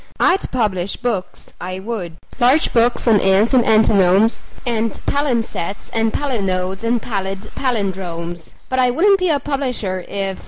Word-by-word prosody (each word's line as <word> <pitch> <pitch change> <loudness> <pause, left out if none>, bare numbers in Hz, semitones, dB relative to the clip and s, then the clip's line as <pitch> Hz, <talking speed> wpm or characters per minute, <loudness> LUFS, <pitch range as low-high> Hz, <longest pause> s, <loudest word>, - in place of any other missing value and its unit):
I'd 375 +2 +2
publish 200 -6 -1
books, 195 -7 -4
I 185 +1 -4
would 190 -5 -5 0.2
large 260 +5 +3
books 240 +1 +2
on 220 -3 +5
ants 195 +6 +3
and 250 -2 +5
antinomes 215 -1 +4 0.2
And 230 -2 0
palimpsests 235 - -2
and 225 -1 +1
palinodes 195 -8 -2
and 235 +1 +1
pallid 195 -2 -4
pallindromes: 180 - -3
But 260 - -1
I 250 -1 +4
wouldn't 390 +10 +3
be 365 -1 +1
a 295 -3 +2
publisher 250 -10 -3
if 195 -1 -3
220 Hz, 145 wpm, -19 LUFS, 190-245 Hz, 0.2 s, on